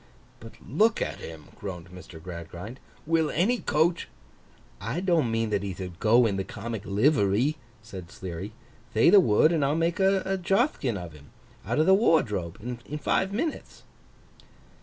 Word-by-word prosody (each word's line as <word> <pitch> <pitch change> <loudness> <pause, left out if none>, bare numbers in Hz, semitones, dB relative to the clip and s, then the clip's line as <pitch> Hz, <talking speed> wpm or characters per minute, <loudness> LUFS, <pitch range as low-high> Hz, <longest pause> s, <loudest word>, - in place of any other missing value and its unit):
'But 115 0 -11
look 220 - +2
at - - -3
him,' 80 -2 -10
groaned 90 -3 -7
Mr. 90 -2 -11
Gradgrind. 90 +7 -8 0.3
'Will 160 -1 +2
any 220 +11 +1
coach—' 165 +3 +1 0.7
'I 175 - -3
don't 170 -9 +2
mean 115 -1 -1
that 100 -2 +1
he 100 -1 -4
thould 90 -1 -8
go 115 +3 +5
in 100 -3 0
the 95 - -1
comic 110 0 -6
livery,' 110 +4 +2 0.3
said 95 -6 -9
Sleary. 95 +3 -7 0.4
'Thay 115 +10 +5
the 205 - +9
word, 155 - +4
and 160 -4 +1
I'll 140 +2 +1
make 165 +3 0
a 190 0 +2
Jothkin 185 - +1
of 90 -3 -8
him, 70 -2 -15 0.4
out 120 - -1
of 155 - +4
the 190 - +6
wardrobe, 105 - +2 0.3
in 150 - -3
five 190 +5 0
minutes. 290 +10 -4
115 Hz, 160 wpm, -27 LUFS, -, 0.7 s, the